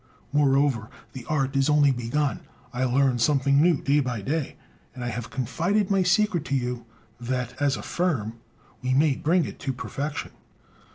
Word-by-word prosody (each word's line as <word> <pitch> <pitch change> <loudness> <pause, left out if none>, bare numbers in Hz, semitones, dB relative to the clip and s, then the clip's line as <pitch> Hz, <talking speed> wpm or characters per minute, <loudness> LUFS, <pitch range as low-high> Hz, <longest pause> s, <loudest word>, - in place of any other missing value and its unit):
Moreover, 140 -5 +2 0.2
the 125 -3 -8
art 135 -3 -1
is 135 +1 +2
only 145 -2 +5
begun; 130 +4 -1 0.3
I 125 +1 0
learn 130 0 +2
something 140 +2 +3
new 165 -3 +4
day 140 +2 +2
by 125 -6 -2
day; 145 +6 -2 0.4
and 125 - -6
I 120 - -2
have 120 0 -5
confided 180 - 0
my 195 -1 +3
secret 190 -2 +2
to 140 - -1
you, 125 -2 -3 0.3
that 125 0 -3
as 140 -3 +2
a 100 - -8
firm 120 - -2 0.4
we 130 0 0
may 145 +1 +4
bring 165 +3 +2
it - - -8
to 135 - -3
perfection." 140 +3 -5
135 Hz, 170 wpm, -25 LUFS, 125-150 Hz, 0.4 s, only